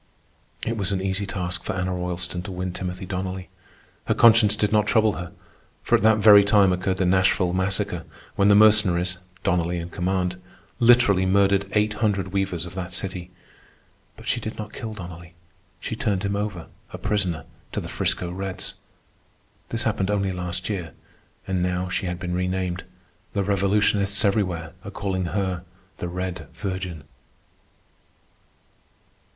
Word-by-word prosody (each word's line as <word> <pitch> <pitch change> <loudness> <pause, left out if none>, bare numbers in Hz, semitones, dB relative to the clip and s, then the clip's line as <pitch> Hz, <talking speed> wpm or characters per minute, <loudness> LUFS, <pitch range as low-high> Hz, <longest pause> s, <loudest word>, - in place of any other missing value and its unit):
It 115 0 -1
was 100 -2 -1
an 95 - 0
easy 95 +1 -1
task 90 -2 -3
for 105 - -3
Anna 95 -1 -1
Roylston 90 0 -3
to 100 - -5
win 90 0 -3
Timothy 90 +1 -5
Donnelly. 95 0 -4 0.6
Her - - +2
conscience 110 -2 +6
did 105 -1 0
not 105 -1 +3
trouble 110 0 +3
her, 90 0 -6 0.5
for - - -2
at - - +2
that 110 +1 +5
very 105 -1 +8
time 100 -2 +5
occurred 95 +1 -1
the 95 - +1
Nashville 95 -1 +3
Massacre, 95 +1 -1 0.3
when 100 - +3
the 100 - +7
Mercenaries, 95 -4 +4 0.2
Donnelly 85 0 +1
in 85 0 -5
command, 90 0 -1 0.4
literally 115 -6 +5
murdered 100 0 +3
eight 105 0 +2
hundred 105 -3 0
weavers 95 -3 -1
of 90 - -9
that 90 -1 -5
city. 90 -1 -3 0.9
But - - -12
she - - +1
did 110 - -6
not 105 -1 -7
kill 110 -3 -6
Donnelly. 85 -2 -9 0.4
She - - -4
turned 100 -2 -1
him 100 0 -1
over, 100 -5 -3 0.3
a - - -6
prisoner, 90 -7 -1 0.3
to - - -2
the - - -6
'Frisco 90 -1 -1
Reds. 95 +1 -4 1.0
This 115 0 0
happened 105 -3 0
only 100 -2 +1
last 90 0 -3
year, 95 -6 -4 0.5
and 95 -1 0
now 90 0 -1
she 95 - -2
had 90 0 -3
been 90 -2 -3
renamed. 90 0 -2 0.5
The 100 - +1
revolutionists 100 +1 +2
everywhere 90 -5 0
are 100 - -6
calling 95 -2 -2
her 90 +1 -2 0.3
the 90 - -4
"Red 90 -3 -4
Virgin." 95 -5 -4
95 Hz, 155 wpm, -24 LUFS, 90-100 Hz, 1.0 s, very